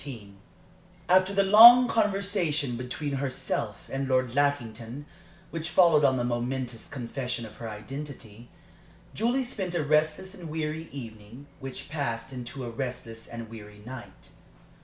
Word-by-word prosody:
XV - - -11 1.0
After 185 +1 +4
the 200 0 +3
long 235 +5 +10
conversation 195 - 0
between 135 +4 -4
herself 135 -1 -3
and 135 0 -3
Lord 130 -2 +1
Lackington 140 -2 -1 0.5
which 165 0 -4
followed 165 -3 +5
on 130 -2 +4
the 120 - 0
momentous 120 0 -3
confession 125 -1 -4
of 105 -1 -12
her 115 -1 -6
identity, 120 0 -8 0.6
Julie 240 +5 +1
spent 190 -8 -4
a 165 - +1
restless 155 +5 +1
and 175 -5 -9
weary 155 +1 -3
evening, 115 0 -10
which 135 -1 -6
passed 135 -4 -3
into 125 +1 -6
a 120 - -5
restless 115 -2 -6
and 115 -1 -7
weary 105 -2 -12
night. 125 -1 -10
135 Hz, 135 wpm, -28 LUFS, 120-160 Hz, 1.0 s, long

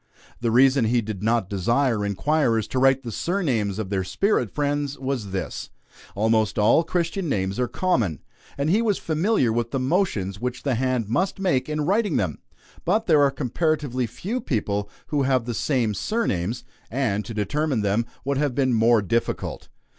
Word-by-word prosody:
The 115 - 0
reason 130 +1 +4
he 120 +2 +2
did 105 -3 -6
not 115 -2 +1
desire 115 +4 +1
inquirers 115 +1 +1
to 130 - -1
write 135 0 +4
the 120 - -5
surnames 120 - -1
of 105 -3 -4
their 95 -2 0
spirit 125 - +1
friends, 145 +2 -1
was 130 -6 -3
this: 95 -8 -4 0.5
almost 110 0 +1
all 110 +10 +4
Christian 175 +1 -1
names 95 -3 -1
are 125 - +1
common, 115 - 0 0.4
and 140 +3 +1
he 215 +5 +3
was 215 -4 +1
familiar 160 - +1
with 120 0 -1
the 135 - -2
motions 130 - 0
which 125 0 -3
the 140 - +1
hand 125 -2 0
must 185 - 0
make 155 -9 +1
in 150 0 -1
writing 200 +3 +1
them; 90 -7 -1 0.4
but 215 +6 +1
there 155 -4 +5
are 140 - +5
comparatively 135 -2 -1
few 210 - -4
people 105 -4 -2 0.2
who 145 -2 +1
have 130 -3 +2
the 120 - -3
same 120 -3 0
surnames, 120 - -1 0.3
and 110 -5 0
to 115 - -7
determine 130 +5 0
them 105 +3 0 0.2
would 140 0 0
have 145 -4 0
been 130 -3 +2
more 115 -1 +4
difficult. 115 +4 -2
125 Hz, 175 wpm, -24 LUFS, 110-150 Hz, 0.5 s, there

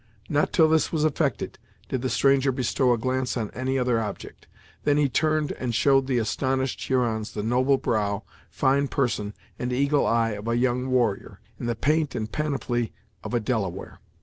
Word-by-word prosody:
Not 145 0 +1
till 160 -2 +5
this 160 0 +2
was 155 -2 +1
effected 140 -5 -1 0.3
did 130 - -2
the 130 - -1
stranger 135 0 +3
bestow 130 0 +1
a 120 - +3
glance 130 +2 -1
on 110 -3 -3
any 130 +1 -2
other 125 -3 +1
object; 105 -2 -7 0.4
then 145 -1 +3
he 145 -1 +3
turned 155 +2 +1
and 120 -3 -3
showed 135 +2 +3
the 130 -2 +1
astonished 130 +3 -1
Hurons 115 -4 0
the 105 - -3
noble 130 +4 +2
brow, 105 -4 -1 0.3
fine 140 +2 +2
person, 110 -7 -1 0.2
and 125 0 -2
eagle 140 +3 +2
eye, 115 -1 +2
of 105 +1 -6
a 115 0 +1
young 125 +1 +1
warrior, 120 -6 0 0.2
in - - -4
the 120 - 0
paint 150 +4 +1
and 110 -2 -3
panoply 135 -6 -2 0.3
of - - -3
a - - +3
Delaware. 105 -6 -3
130 Hz, 180 wpm, -25 LUFS, 115-140 Hz, 0.4 s, till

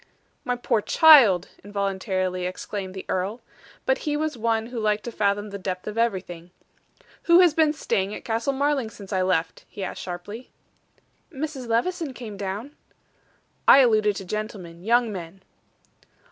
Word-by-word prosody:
"My 250 - -1
poor 240 -2 0
child!" 235 - +6
involuntarily 190 -2 -2
exclaimed 190 +1 -6
the 190 - -7
earl. 195 +6 -2 0.4
But - - +2
he 295 -2 -2
was 310 0 -2
one 225 -1 0
who 240 0 -6
liked 210 -1 0
to 240 - -5
fathom 205 -1 -1
the 200 - -6
depth 185 -1 -4
of 210 - -5
everything. 185 -7 -2 0.8
"Who 340 +1 +6
has 350 -4 +5
been 315 -1 +3
staying 200 -9 -2
at - - -10
Castle 230 +4 0
Marling 275 -3 0
since 200 -3 -10
I 185 - +1
left?" 180 -3 -1
he 200 - -7
asked 185 - -5
sharply. 190 +7 -7 0.8
"Mrs. 275 -3 -5
Levison 275 +5 -1
came 225 -4 -8
down." 200 +8 -5 0.9
"I - - +9
alluded 215 -4 +3
to 195 - -6
gentlemen 185 -4 -6
young 235 +1 +2
men." 180 +1 -8
215 Hz, 155 wpm, -24 LUFS, 190-245 Hz, 0.9 s, I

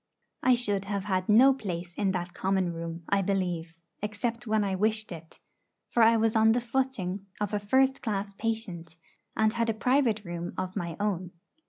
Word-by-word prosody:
I 255 -1 +5
should 205 -5 -1
have 200 -1 -2
had 185 -2 -1
no 255 +6 +7
place 175 -8 -5
in 195 +1 0
that 175 -1 -3
common 190 -2 0
room, 165 0 -6
I 200 0 +3
believe, 180 -4 -2 0.2
except 230 +3 -3
when 215 -1 +2
I 195 -1 -1
wished 215 +2 0
it; 165 -1 -10 0.5
for 235 - +3
I 225 0 +6
was 225 0 +2
on 220 0 +5
the 245 - +2
footing 235 -6 -2
of 210 0 -2
a 210 - +1
'first 265 +6 +2
class 200 -3 -2
patient,' 195 -7 -4 0.4
and 220 0 +3
had 230 -1 0
a 225 - 0
private 240 -3 +2
room 175 0 -5
of 185 0 -3
my 170 -5 -4
own. 185 -4 -2
205 Hz, 185 wpm, -28 LUFS, 180-225 Hz, 0.5 s, no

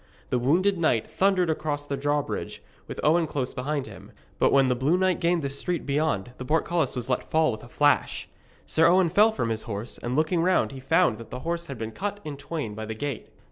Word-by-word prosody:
The 125 - +2
wounded 175 +9 +2
knight 125 -9 +2
thundered 185 -3 +2
across 145 -2 -3
the 145 - -3
drawbridge, 145 +1 -2 0.2
with - - -7
Owen 160 +2 +3
close 130 -3 -3
behind 140 +2 -2
him; - - -12 0.3
but - - +4
when 135 -1 +5
the 125 - +3
blue 140 +8 +2
knight 185 -1 +1
gained 170 -2 +1
the 140 - -1
street 170 +5 -3
beyond, 140 -7 0
the - - -4
portcullis 160 0 0
was 125 -1 -3
let 125 -1 -1
fall 160 -3 +3
with 110 - -7
a 120 - -12
rush. 145 0 +2 0.4
Sir 160 +1 +4
Owen 180 0 +4
fell 210 +6 +5
from 170 - -2
his 110 -1 -2
horse, 105 +3 -5
and 120 +1 -3
looking 160 +3 +2
round 185 -3 +2
he 135 - -8
found 160 -4 +2
that 115 -1 -10
the 125 - -6
horse 170 +2 -3
had 135 - -6
been 110 0 -5
cut 205 - -4
in 150 -2 -5
twain 140 -5 -5
by 110 +1 -6
the 110 - -4
gate. 140 +1 -5
145 Hz, 225 wpm, -26 LUFS, 125-170 Hz, 0.4 s, when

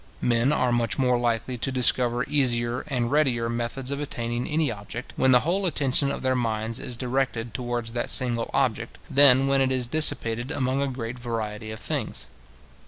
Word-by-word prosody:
Men 120 +3 +2
are 130 -4 +1
much 120 -2 0
more 125 -2 +2
likely 120 +1 -2
to 135 - -2
discover 125 -1 +3
easier 120 -4 0
and 125 -5 -2
readier 130 -6 +1
methods 120 +3 -4
of 140 - -3
attaining 120 -4 -3
any 155 -3 0
object, 110 +3 -8
when 130 - +2
the 125 -1 +6
whole 185 +4 0
attention 140 -3 +1
of - - -4
their 130 0 +1
minds 115 -2 -2
is 125 - -5
directed 125 -2 -2
towards 120 -2 -4
that 120 0 -3
single 120 -2 +3
object, 120 -4 -1
than 135 -1 +7
when 135 0 +2
it 130 -1 +1
is 130 -1 0
dissipated 120 -3 +1
among 135 -2 -1
a 140 - 0
great 125 -2 -6
variety 110 -2 -5
of 110 0 -7
things. - - -3
125 Hz, 180 wpm, -25 LUFS, 120-135 Hz, -, than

